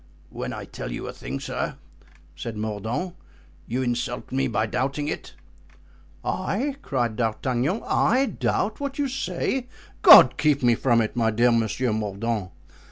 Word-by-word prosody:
"When -, -, -5 dB
I -, -, -6 dB
tell -, -, -7 dB
you -, -, -5 dB
a -, -, -6 dB
thing, 65 Hz, +3 st, -6 dB
sir," -, -, -3 dB, 0.6 s
said 105 Hz, +7 st, -6 dB
Mordaunt, 110 Hz, -, -3 dB, 0.5 s
"you 125 Hz, +3 st, -1 dB
insult 120 Hz, 0 st, -3 dB
me 135 Hz, +1 st, +1 dB
by 110 Hz, -2 st, 0 dB
doubting 135 Hz, +5 st, -2 dB
it." 155 Hz, -, -5 dB, 0.9 s
"I!" 280 Hz, +1 st, -1 dB
cried 120 Hz, -, -1 dB
D'Artagnan, 125 Hz, -, -1 dB
"I 260 Hz, +4 st, +3 dB
doubt 215 Hz, -4 st, -1 dB
what 280 Hz, -1 st, -4 dB
you 290 Hz, -1 st, +1 dB
say! 265 Hz, -1 st, -2 dB, 0.3 s
God -, -, +9 dB
keep 145 Hz, -3 st, +2 dB
me 120 Hz, -1 st, +5 dB
from 115 Hz, 0 st, +2 dB
it, 110 Hz, -, -2 dB
my 115 Hz, -2 st, +2 dB
dear 120 Hz, +3 st, +3 dB
Monsieur 115 Hz, +1 st, +1 dB
Mordaunt! 105 Hz, -1 st, -2 dB
120 Hz, 150 wpm, -25 LUFS, 110-150 Hz, 0.9 s, God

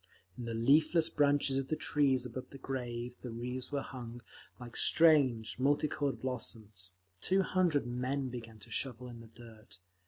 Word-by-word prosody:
In 120 Hz, -, -6 dB
the 115 Hz, -1 st, -3 dB
leafless 155 Hz, +7 st, +4 dB
branches 145 Hz, -2 st, +2 dB
of 135 Hz, -, -4 dB
the 155 Hz, -, 0 dB
trees 135 Hz, -5 st, +2 dB
above 125 Hz, +1 st, -7 dB
the 140 Hz, -, -10 dB
grave 125 Hz, -2 st, -5 dB
the 125 Hz, -, -6 dB
wreaths 125 Hz, +3 st, -5 dB
were 140 Hz, -1 st, -1 dB
hung, 120 Hz, -1 st, -8 dB, 0.4 s
like 120 Hz, -1 st, -10 dB
strange, 135 Hz, -9 st, +4 dB
multi 145 Hz, +3 st, +2 dB
coloured 145 Hz, -2 st, -2 dB
blossoms. 110 Hz, -7 st, -5 dB, 0.3 s
Two 190 Hz, -, +2 dB
hundred 180 Hz, -8 st, +1 dB
men 130 Hz, +2 st, -2 dB
began 115 Hz, -3 st, -8 dB
to -, -, -13 dB
shovel 125 Hz, -2 st, -2 dB
in 120 Hz, -1 st, -10 dB
the 115 Hz, -, -12 dB
dirt. 110 Hz, -3 st, -14 dB
125 Hz, 165 wpm, -33 LUFS, 120-140 Hz, 0.4 s, leafless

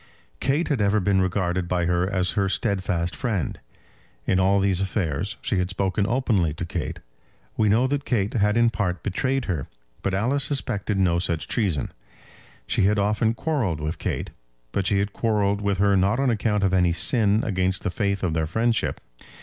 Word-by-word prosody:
Kate 140 Hz, +6 st, +1 dB
had 140 Hz, -7 st, +1 dB
ever 100 Hz, +1 st, +3 dB
been 95 Hz, 0 st, +2 dB
regarded 95 Hz, -1 st, 0 dB
by 90 Hz, -1 st, 0 dB
her 90 Hz, +1 st, +1 dB
as 95 Hz, -2 st, +1 dB
her 100 Hz, -1 st, 0 dB
steadfast 95 Hz, -4 st, -1 dB
friend. 105 Hz, -, -2 dB, 0.7 s
In 95 Hz, -, +2 dB
all 95 Hz, +2 st, +3 dB
these 95 Hz, -1 st, +1 dB
affairs 95 Hz, -1 st, -2 dB
she 95 Hz, -, 0 dB
had 90 Hz, 0 st, -1 dB
spoken 95 Hz, +1 st, 0 dB
openly 110 Hz, -, +1 dB
to 85 Hz, -, -4 dB
Kate. 85 Hz, -, -4 dB, 0.5 s
We 105 Hz, -1 st, +2 dB
know 115 Hz, +5 st, +3 dB
that 140 Hz, +1 st, -1 dB
Kate 110 Hz, -3 st, 0 dB
had 105 Hz, -2 st, +2 dB
in 120 Hz, 0 st, +4 dB
part 95 Hz, -6 st, -2 dB
betrayed 130 Hz, +6 st, -1 dB
her, 80 Hz, -9 st, -3 dB, 0.3 s
but 95 Hz, -, -1 dB
Alice 130 Hz, +8 st, +1 dB
suspected 110 Hz, -8 st, -1 dB
no 90 Hz, -3 st, +2 dB
such 85 Hz, -3 st, -2 dB
treason. 95 Hz, -, -1 dB, 0.7 s
She -, -, +1 dB
had 105 Hz, +1 st, +3 dB
often 105 Hz, +2 st, +1 dB
quarrelled 115 Hz, -, -1 dB
with 75 Hz, +2 st, -4 dB
Kate; -, -, -3 dB, 0.4 s
but 95 Hz, +5 st, -1 dB
she 100 Hz, -, +2 dB
had 100 Hz, +1 st, -1 dB
quarrelled 105 Hz, -3 st, +1 dB
with 100 Hz, -1 st, 0 dB
her 100 Hz, +1 st, +3 dB
not 100 Hz, +5 st, +2 dB
on 135 Hz, -2 st, +2 dB
account 105 Hz, -2 st, 0 dB
of 95 Hz, -1 st, +2 dB
any 90 Hz, -2 st, +3 dB
sin 105 Hz, +4 st, +3 dB
against 95 Hz, -2 st, -1 dB
the -, -, -1 dB
faith 100 Hz, 0 st, -1 dB
of 85 Hz, -3 st, 0 dB
their 80 Hz, -1 st, 0 dB
friendship. 115 Hz, +6 st, 0 dB
100 Hz, 185 wpm, -24 LUFS, 90-110 Hz, 0.7 s, in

